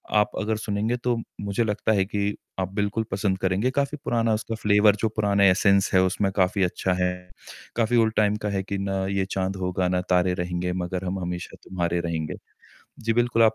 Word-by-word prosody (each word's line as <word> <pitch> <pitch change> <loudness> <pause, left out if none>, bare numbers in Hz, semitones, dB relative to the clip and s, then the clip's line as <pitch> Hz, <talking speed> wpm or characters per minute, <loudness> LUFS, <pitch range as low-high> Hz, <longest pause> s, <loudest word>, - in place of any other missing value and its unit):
आप 105 0 +3
अगर 110 0 -1
सुनेंगे 110 +2 -1
तो 120 -1 +2 0.3
मुझे 100 +3 0
लगता 110 0 0
है 95 -2 +3
कि 100 +1 -1 0.2
आप 95 0 -2
बिल्कुल 105 +2 0
पसंद 95 0 0
करेंगे, 95 +7 +1
काफ़ी 140 +2 -1
पुराना 115 -1 +1
उसका 110 +1 -2
फ्लेवर 105 -1 +4
जो 110 - +1
पुराना 100 -2 +2
एसेंस 100 +1 +4
है 95 - +6
उसमें 95 +1 +1
काफ़ी 95 +1 +2
अच्छा 90 +1 0
है, 90 - +2 0.6
काफ़ी 120 +1 +2
ओल्ड 110 -1 +3
टाइम 105 -1 +3
का - - +1
है 95 -1 -1
कि 100 +1 -3
"ना 95 -1 -1
ये 95 - +1
चाँद 95 0 -1
होगा 90 0 0
ना 90 - +1
तारे 90 0 +3
रहेंगे 90 0 -2
मगर 90 +1 -3
हम 95 +1 -2
हमेशा 90 -1 -5
तुम्हारे 85 -2 -1
रहेंगे।" 80 -3 -3 0.7
जी, 115 - +3
बिल्कुल 120 -1 +2
आप 110 0 +5
100 Hz, 200 wpm, -25 LUFS, 95-110 Hz, 0.7 s, है